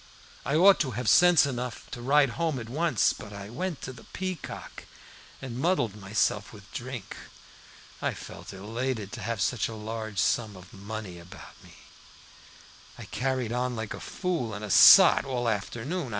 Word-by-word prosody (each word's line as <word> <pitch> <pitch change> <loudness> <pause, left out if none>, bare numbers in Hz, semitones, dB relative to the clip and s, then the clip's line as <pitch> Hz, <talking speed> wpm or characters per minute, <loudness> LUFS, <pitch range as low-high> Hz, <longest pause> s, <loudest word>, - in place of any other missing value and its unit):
I 140 - +1
ought 190 +4 +6
to 140 - 0
have 125 - -3
had - - -4
sense 175 0 +6
enough 125 -3 -5
to 120 - -7
ride 140 +2 +4
home 165 0 -1
at 115 -2 -7
once, 160 +6 +2
but 105 - -10
I 100 0 -8
went 170 +5 -4
to 130 - -6
the 120 - -14
Peacock 185 -4 -6 0.6
and 125 -2 -6
muddled 135 - +1
myself 105 +1 -1
with 100 -2 -15
drink. 125 -3 -6 0.9
I - - -1
felt - - -10
elated 110 +2 -4
at - - -6
having 115 -2 -3
such 125 0 0
a 115 - -7
large 110 -1 -6
sum 105 +2 +1
of 90 0 -15
money 100 -2 -7
about 90 +3 -13
me, - - -16 1.2
and - - -11
carried 130 -3 -1
on 125 0 -1
like 110 -1 -4
a - - -8
fool 165 - -3
and 105 +1 -6
a 105 - -5
sot - - +8
all 125 -3 -2
afternoon. 120 - -3
120 Hz, 175 wpm, -27 LUFS, 105-135 Hz, 1.2 s, sot